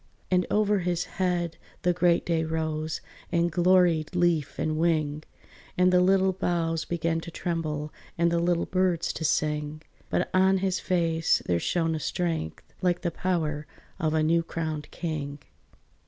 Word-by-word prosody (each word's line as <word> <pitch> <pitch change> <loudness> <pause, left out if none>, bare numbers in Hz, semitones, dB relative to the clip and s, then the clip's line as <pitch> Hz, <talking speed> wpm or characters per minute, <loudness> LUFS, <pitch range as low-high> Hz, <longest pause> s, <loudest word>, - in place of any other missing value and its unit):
And 180 -1 +3
over 210 -1 +2
his 175 -1 0
head 175 -3 -1 0.3
the 180 0 +3
great 175 -1 +2
day 165 -2 +1
rose 160 -1 -2 0.3
And 170 0 +2
gloried 175 -1 +3
leaf 175 -5 +1
and 155 0 -1
wing, 155 -3 +1 0.6
And 180 0 +4
the 180 - +6
little 190 +1 +4
boughs 170 -3 -1
began 165 -1 -1
to 165 - -8
tremble, 155 -3 -3 0.2
And 170 0 +3
the 170 - +2
little 170 0 +1
birds 185 -2 0
to - - -5
sing; 150 0 0 0.3
But - - 0
on 190 +1 +4
his 190 -1 0
face 165 -3 +1
there 85 -1 +1
shone 165 - 0
a 160 - -2
strength 165 - -2 0.2
Like 175 -1 +1
the 170 - -1
power 155 -4 -1 0.3
of 155 0 0
a 155 - +2
new 165 +2 +3
crowned 160 -2 -4
king. 150 -4 -4
170 Hz, 155 wpm, -27 LUFS, 155-180 Hz, 0.6 s, the